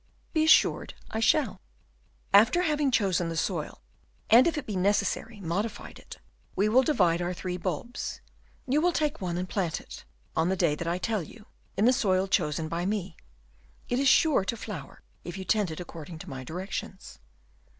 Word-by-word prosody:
"Be 315 -2 +3
assured 320 - +4 0.2
I 220 - -2
shall." 240 0 +2 0.7
"After 220 - +6
having 300 -4 +1
chosen 185 -8 +1
the 165 - -4
soil, - - -2 0.5
and, 240 +6 +8
if 330 - 0
it 290 - -4
be 210 - -4
necessary, 205 +3 0
modified 200 +5 -4
it, - - -11 0.4
we 200 - +2
will 240 +5 +5
divide 180 - +2
our 175 +1 -2
three 180 0 -4
bulbs; 185 +6 -4 0.5
you 275 +4 +2
will 355 +1 +2
take 300 -7 -1
one 175 -2 -2
and 180 +1 -3
plant 180 -5 -1
it, - - -11 0.3
on 165 +2 +2
the 190 - +1
day 170 -5 +2
that 165 +3 -4
I 170 - +1
will 180 - -3
tell 220 -2 0
you, 210 +7 -12 0.3
in 210 - +3
the 250 - +6
soil 195 -7 +1
chosen 160 -4 0
by 170 +2 -3
me. 190 -3 -2 0.7
It 245 - +1
is 275 - +2
sure 305 - +5
to 230 - -2
flower, 185 -11 -8 0.2
if 175 +1 -7
you 190 - -6
tend 210 -3 +1
it 160 - -6
according 165 -1 -8
to - - -10
my 130 -1 -6
directions." 185 +4 -6
195 Hz, 190 wpm, -28 LUFS, 175-235 Hz, 0.7 s, and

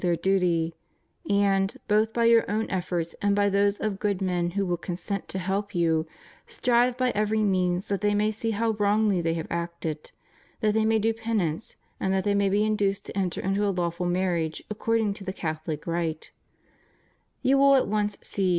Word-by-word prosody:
their 175 -2 +2
duty; 175 -3 +1 0.6
and, 200 +2 +2
both 215 +1 +3
by 235 0 +1
your 230 0 +6
own 215 +2 0
efforts 175 -3 -2
and 205 0 +2
by 205 0 +3
those 200 +1 +2
of 205 -3 -2
good 205 -3 0
men 180 -2 0
who 200 - +1
will 175 -1 0
consent 180 +3 -4
to - - -5
help 195 +2 -2
you, 165 -2 +1 0.4
strive 245 0 +2
by 255 -1 +1
every 215 0 +1
means 185 -2 +1
that 200 -1 -1
they 205 0 +2
may 210 +1 +2
see 220 +1 -3
how 225 +1 +1
wrongly 205 -2 +2
they 165 0 0
have 160 - -3
acted; 170 -2 -4 0.5
that 215 -2 +2
they 220 0 +2
may 220 0 +3
do 225 +1 +1
penance; 220 -6 -2 0.2
and 190 - 0
that 190 0 +1
they 205 - +1
may 200 -1 +2
be 205 +2 +2
induced 200 -2 0
to - - -9
enter 185 -3 -1
into 195 +2 0
a 205 - +2
lawful 175 -1 -1
marriage 175 -3 -1
according 220 -1 0
to 200 - -9
the 190 - -3
Cathohc 155 -3 -4
rite. 165 -2 -3 1.1
You 270 +1 +4
will 275 0 +6
at 265 - +3
once 210 0 -1
see. 195 -2 -1
200 Hz, 195 wpm, -26 LUFS, 175-215 Hz, 1.1 s, your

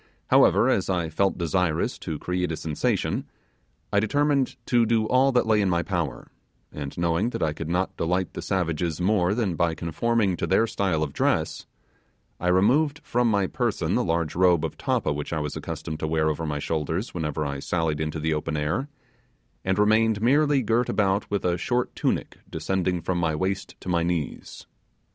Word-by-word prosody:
However, - - +5
as - - +1
I 85 -3 0
felt 95 +4 +1
desirous 85 -1 0
to 80 - -4
create 90 +2 -2
a 80 - -3
sensation, 75 -2 -1 0.7
I 100 - +5
determined 140 +4 +1
to 120 -2 +3
do 110 -1 +2
all 130 +3 +4
that 125 - +3
lay 110 -1 +3
in 100 - +1
my 85 -1 +1
power; - - -3 0.4
and 70 -2 -7
knowing 85 +6 +1
that - - -3
I 75 -2 +1
could 80 +1 -6
not 90 +2 -1
delight 90 +3 -1
the - - -5
savages 85 -3 -1
more 95 0 +2
than 110 -6 0
by 80 0 +1
conforming 95 +4 0
to - - -2
their 95 +4 +3
style 95 -8 0
of 70 - -4
dress, - - 0 0.7
I 90 - -2
removed 130 - +3
from 120 0 +1
my 100 -3 +2
person - - -1
the - - +2
large 80 -2 -1
robe 90 -3 +3
of 80 - -5
tappa - - 0
which 75 0 -5
I 80 - -1
was 75 -1 -3
accustomed 80 -1 -5
to 80 - -2
wear 80 0 +1
over 80 +1 -4
my 75 -1 -2
shoulders 80 +7 -2
whenever 75 -3 -2
I 70 -1 -3
sallied 80 0 -1
into 80 0 -2
the 80 +1 0
open 75 +1 -2
air, 90 - -1 0.7
and 95 0 0
remained 110 +1 +3
merely 140 +3 +3
girt 115 +3 +1
about 100 -1 +1
with 100 -2 -2
a 90 -1 +1
short 120 +7 -1
tunic - - -2
descending 90 +2 -1
from 90 +1 -1
my 80 -2 0
waist 95 +4 -2
to - - -11
my 85 -2 +1
knees. 85 -3 -3
90 Hz, 190 wpm, -25 LUFS, 80-105 Hz, 0.7 s, However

